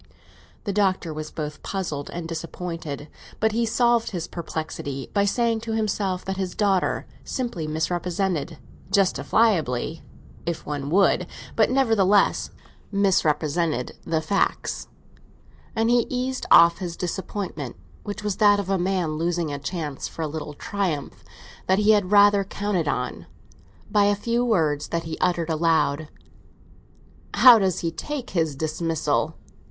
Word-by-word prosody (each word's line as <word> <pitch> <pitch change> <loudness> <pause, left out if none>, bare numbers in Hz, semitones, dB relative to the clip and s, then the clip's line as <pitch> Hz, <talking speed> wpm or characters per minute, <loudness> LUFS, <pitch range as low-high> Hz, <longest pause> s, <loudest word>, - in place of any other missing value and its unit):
The 200 - -2
Doctor 190 -5 +1
was 155 0 -5
both 150 -1 -6
puzzled 160 -8 -4
and 170 -1 -5
disappointed, 165 -3 -5 0.3
but 220 0 +2
he 230 +1 0
solved 235 0 +2
his 175 -4 -4
perplexity 155 -5 -5
by 200 -1 +3
saying 230 +2 +1
to 225 0 -4
himself 200 -4 -1
that 190 0 -3
his 190 -2 -3
daughter 195 -3 +1 0.2
simply 235 -12 -3
misrepresented—justifiably, 175 - 0 0.4
if 170 -1 -4
one 145 -1 -3
would? 180 0 +3 0.3
but 220 - +4
nevertheless 225 -7 +3 0.4
misrepresented—the 160 - 0
facts; 190 +5 -1 0.9
and 225 +1 +2
he 240 -1 +3
eased 255 +1 -2
off 170 0 +7
his 175 -2 -5
disappointment, 180 - -4 0.3
which 205 0 -6
was 210 -2 -1
that 205 -2 +5
of 195 -1 -3
a 195 - +2
man 175 -4 0
losing 170 -2 -1
a 140 - -4
chance 150 -1 -4
for 165 - -6
a - - -1
little 150 -1 -6
triumph 175 -6 -3 0.4
that 190 - +4
he 210 +1 +4
had 205 -4 +3
rather 205 0 +6
counted 195 -4 -2
on, 125 -3 -3 0.6
by 205 -1 +4
a 205 0 +3
few 235 +4 0
words 160 -11 +1
that 165 0 -2
he 160 -1 -5
uttered 170 -2 +1
aloud. 155 -2 +1 1.3
"How 245 -3 +9
does 190 -3 0
he 165 - -1
take 275 - -5
his 160 -5 0
dismissal?" 160 +2 -1
180 Hz, 135 wpm, -24 LUFS, 160-205 Hz, 1.3 s, How